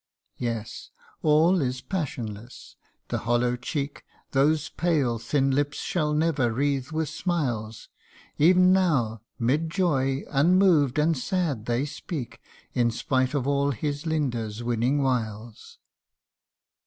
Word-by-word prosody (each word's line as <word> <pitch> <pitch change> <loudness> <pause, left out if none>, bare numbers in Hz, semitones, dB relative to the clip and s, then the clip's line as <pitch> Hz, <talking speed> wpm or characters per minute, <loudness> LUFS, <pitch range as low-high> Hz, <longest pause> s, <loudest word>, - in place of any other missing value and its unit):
Yes 115 -2 -4 0.3
all 160 +4 +4
is 130 -1 -1
passionless 120 - -6 0.3
the - - -1
hollow 120 +2 +1
cheek 140 +3 -4 0.3
Those 150 +2 +2
pale 145 -9 0
thin 135 +4 +1
lips 145 +2 0
shall 150 -4 -1
never 150 -6 +1
wreathe 135 +1 -1
with 160 0 -1
smiles; 120 - -3 0.5
Ev'n 180 +4 +6
now, 135 - +1 0.2
'mid 145 +8 +1
joy, 140 -7 0
unmoved 160 -2 +4
and 160 +2 +3
sad 145 - -2
they 120 +3 0
speak 135 -5 -6 0.3
In 120 -2 +2
spite 130 +4 0
of 135 -3 0
all 140 0 +1
his 145 +4 -3
Linda's 120 -8 -2
winning 120 +4 +1
wiles. 115 -3 -3
140 Hz, 115 wpm, -26 LUFS, 120-155 Hz, 0.5 s, Ev'n